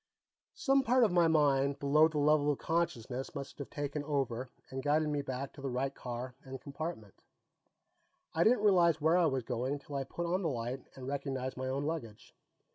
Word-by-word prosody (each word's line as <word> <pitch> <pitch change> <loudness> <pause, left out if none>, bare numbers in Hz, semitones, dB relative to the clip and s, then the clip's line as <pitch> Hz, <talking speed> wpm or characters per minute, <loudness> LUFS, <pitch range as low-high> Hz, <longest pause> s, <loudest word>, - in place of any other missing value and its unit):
Some 275 -1 +3
part 255 0 +4
of 215 - +4
my 175 -1 +4
mind 140 -3 +3
below 150 +3 +5
the 160 -2 -4
level 150 0 +4
of 145 - -2
consciousness 135 -6 -2
must 140 0 -7
have 140 - -6
taken 145 0 -3
over 130 -4 -1 0.2
and 135 0 -3
guided 150 +2 +2
me 145 -1 0
back 135 0 -5
to - - -11
the 135 - -2
right 135 +2 -1
car 125 0 -6
and 130 0 -7
compartment; 140 - -7 1.1
I 165 - +3
didn't 225 0 +4
realize 175 -6 +5
where 160 +3 +3
I 170 - +4
was 135 -4 -1
going 125 +4 -2
till 145 0 -9
I 135 - 0
put 170 +6 -5
on 180 +3 0
the 165 - 0
light 125 0 -3
and 130 - -8
recognized 135 -2 -3
my 130 0 -4
own 135 +2 -1
luggage. 125 -10 -5
140 Hz, 200 wpm, -33 LUFS, 130-160 Hz, 1.1 s, below